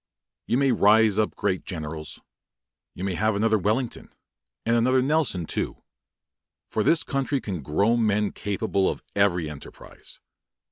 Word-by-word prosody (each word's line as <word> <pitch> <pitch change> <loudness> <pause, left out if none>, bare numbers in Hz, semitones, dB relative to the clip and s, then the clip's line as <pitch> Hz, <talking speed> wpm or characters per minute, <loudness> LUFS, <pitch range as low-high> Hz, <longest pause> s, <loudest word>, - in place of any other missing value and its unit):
You 120 - +2
may 135 -1 +3
raise 110 -1 +4
up 110 - 0
great 90 - -1
generals. 80 -3 -6 0.7
You 90 - -6
may 95 -1 -1
have 110 +3 +1
another 110 +1 +2
Wellington, 110 +6 -2 0.5
and 115 - +2
another 130 +3 +3
Nelson, 140 - +1
too; - - -3 0.8
for 110 - -1
this 160 +9 +3
country 135 0 -1
can 95 - -5
grow 100 - +1
men 105 -3 +1
capable 100 -1 -1
of - - -5
every 90 -5 +2
enterprise. 75 -2 -11
105 Hz, 140 wpm, -25 LUFS, 95-120 Hz, 0.8 s, raise